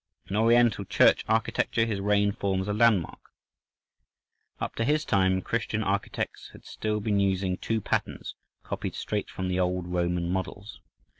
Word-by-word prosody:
In 95 - -5
Oriental 115 -1 +4
church - - +4
architecture 115 +1 +1
his 105 -3 -2
reign 100 0 +2
forms 95 -2 -2
a 105 - 0
landmark: 105 -5 +2 1.4
up - - -3
to 115 - +1
his 150 +5 +1
time 95 -2 +2
Christian 110 -1 -1
architects 100 0 -3
had - - -15
still 105 0 -2
been 105 -1 0
using 95 -1 +1
two 110 +3 -2
patterns - - -2 0.3
copied - - -4
straight - - -3
from 95 -1 -3
Old 90 0 0
Roman 90 -1 -1
models. 95 +3 -4
100 Hz, 145 wpm, -27 LUFS, 95-110 Hz, 1.4 s, Oriental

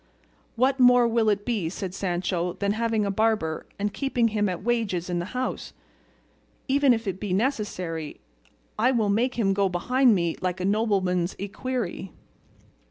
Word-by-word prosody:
"What 260 +3 +2
more 245 -1 +6
will 225 -1 +2
it 205 -1 0
be," 215 -9 -1
said 185 0 -5
Sancho, 180 -2 -2
"than 200 0 -1
having 220 -1 0
a 200 - 0
barber, 210 -6 0
and 205 0 -2
keeping 250 -4 +1
him 210 -2 0
at 180 0 -5
wages 205 -7 -1
in 175 - 0
the 175 - -3
house? 255 - -3
and - - -37 1.0
even 280 -2 +5
if 225 -2 0
it 190 -1 -3
be 200 -3 -3
necessary, 185 - -2 0.6
I 240 +4 +4
will 230 -5 +1
make 235 +5 +1
him 200 -5 +1
go 195 0 +1
behind 245 +7 +3
me 170 -3 -1
like 185 0 -2
a 185 - -2
nobleman's 195 -4 +1
equerry." 200 -2 -4
205 Hz, 165 wpm, -25 LUFS, 185-235 Hz, 1.0 s, more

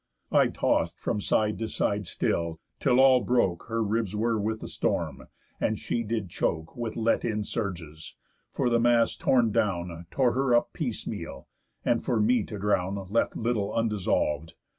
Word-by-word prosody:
I - - +5
toss'd - - 0
from 105 - -1
side 105 +1 +1
to 115 - -2
side 100 -2 -1
still, 85 -1 -1 0.2
till 130 -3 +3
all 130 -1 +6
broke 110 -9 +1
Her 115 0 0
ribs 105 -1 -1
were 115 +1 +1
with 110 +1 -2
the - - -5
storm, - - -2 0.3
and - - 0
she 120 - -2
did 110 -3 -2
choke 80 -1 -2
With 120 -2 -4
let 115 0 +1
in 105 -2 -1
surges; 85 -8 -5 0.4
for - - 0
the 120 - +4
mast 120 0 +3
torn 120 -4 +3
down 85 -4 -1
Tore 130 -3 +2
her 130 -1 +2
up 120 - +1
piecemeal, - - -5 0.4
and - - +2
for 115 - 0
me 115 +3 +3
to 105 - -7
drown 95 -1 0 0.2
Left 115 - +1
little 110 -3 -1
undissolv'd. 90 -8 0
110 Hz, 165 wpm, -27 LUFS, 95-115 Hz, 0.4 s, all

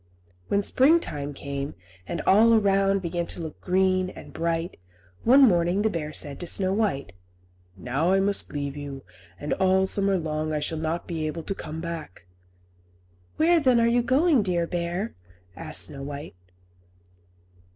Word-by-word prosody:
When 200 0 +1
springtime 255 - +2
came, 140 -2 -5 0.3
and 170 - -3
all 225 +4 +6
around 195 -2 +2
began 170 0 -2
to - - -6
look 160 -3 -7
green 185 0 +1
and - - -12
bright, 165 +1 -2 0.5
one 265 +4 +6
morning 175 +1 +2
the 220 - +1
bear 155 -3 -4
said 145 -2 -3
to 175 - -5
Snow 190 +2 +1
White, 195 - -1 0.7
"Now 135 - 0
I 195 - +4
must 200 +1 +2
leave 140 -1 -4
you, 140 -2 -7 0.4
and 145 - -2
all 190 0 +3
the - - +2
summer 195 0 +2
long 155 -2 -3
I 150 - 0
shall 155 +2 -2
not 160 +2 -2
be 160 -3 -3
able 160 +2 -5
to 195 - -3
come 160 -3 -7
back." 165 - -7 1.1
"Where, 335 +2 +4
then, 255 -5 +3
are 230 - +3
you 240 +1 +3
going, 275 +3 +3
dear 175 -4 0
bear?" 175 +5 -3 0.4
asked - - -1
Snow 140 -2 -4
White. 145 +2 -7
175 Hz, 160 wpm, -25 LUFS, 155-200 Hz, 1.1 s, all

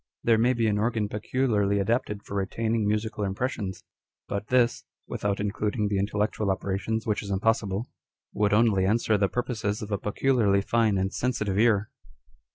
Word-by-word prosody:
There 115 -1 +4
may 120 +3 +3
be 115 -2 0
an 105 -2 +1
organ 110 -1 0
peculiarly 105 -2 0
adapted 105 0 -1
for - - -9
retaining 110 +2 -1
musical 105 0 -1
impressions, 100 -1 -3 0.4
but 100 +1 -4
this 125 -2 +2 0.2
(without 100 -1 -2
including 105 +1 -1
the 100 -1 0
intellectual 105 +1 -1
operations, 100 +4 -2
which 105 -2 0
is 100 - -8
impossible) 100 +1 0 0.5
would 105 -1 +1
only 105 -3 +4
answer 110 +3 +2
the 100 -1 +2
purposes 110 -4 -2
of 105 - -7
a 100 - 0
peculiarly 105 -2 +2
fine 110 -1 +2
and 95 +1 -1
sensitive 105 -6 -1
ear. 110 -2 +3
105 Hz, 160 wpm, -27 LUFS, 100-115 Hz, 0.5 s, There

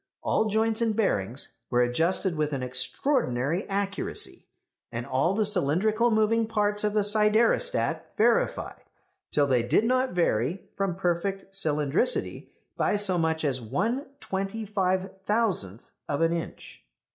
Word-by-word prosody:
All - - +1
joints 220 +1 0
and 225 -2 +1
bearings 125 - -1 0.2
were 125 0 +3
adjusted 165 +8 0
with 150 -1 -1
an 135 -2 -2
extraordinary 130 - -1
accuracy; 195 0 -1 0.4
and 115 +1 -4
all 135 +10 +1
the 215 0 +2
cylindrical 210 +5 +2
moving 220 0 +2
parts 210 -1 0
of 210 0 0
the 210 - +3
siderostat 215 - +2 0.2
verified - - +1 0.5
till 145 - +3
they 130 -3 +2
did 120 - +2
not 255 0 +1
vary 165 - 0
from 195 -3 -1
perfect 190 +2 -2
cylindricity 155 - 0 0.3
by - - +1
so 200 -4 +3
much 160 -1 0
as 130 -3 0
one 225 - -2
twenty 195 +2 -4
five 190 -2 0 0.2
thousandth 195 - -1 0.2
of 145 +2 -1
an 165 0 +3
inch! 170 -1 -7
195 Hz, 135 wpm, -27 LUFS, 150-215 Hz, 0.5 s, were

